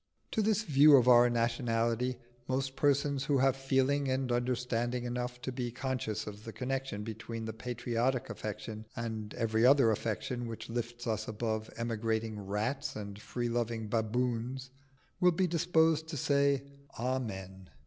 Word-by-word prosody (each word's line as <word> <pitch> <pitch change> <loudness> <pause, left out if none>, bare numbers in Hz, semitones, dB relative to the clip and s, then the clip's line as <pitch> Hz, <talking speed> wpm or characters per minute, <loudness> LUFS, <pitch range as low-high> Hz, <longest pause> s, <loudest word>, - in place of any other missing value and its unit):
To 220 - +1
this 215 0 +2
view 145 -3 +7
of 125 -1 +3
our 120 0 +7
nationality 120 +1 0 0.3
most 135 +1 -1
persons 140 -1 +2
who 140 0 +2
have 135 0 +3
feeling 135 +1 +1
and 130 -1 0
understanding 120 0 0
enough 125 0 -3
to 130 - -2
be 125 -1 -3
conscious 120 -4 -3
of 105 0 -8
the 115 - -7
connection 130 -4 -3
between 110 +1 -6
the 110 - -4
patriotic 120 +2 -1
affection 110 +1 -6
and 110 -2 -4
every 110 0 +1
other 130 -2 +6
affection 115 +3 -2
which 115 0 -7
lifts 120 0 -4
us 110 -2 -1
above 110 0 -2
emigrating 115 -1 -1
rats 110 +9 -2
and 100 -1 -7
free 120 +1 -3
loving 115 -2 -2
baboons, 120 +3 -1 0.5
will 180 -1 +5
be 185 +3 +2
disposed 160 -2 +2
to 160 -2 -5
say 140 0 +2 0.3
Amen. 95 -7 -3
120 Hz, 150 wpm, -32 LUFS, 110-135 Hz, 0.5 s, view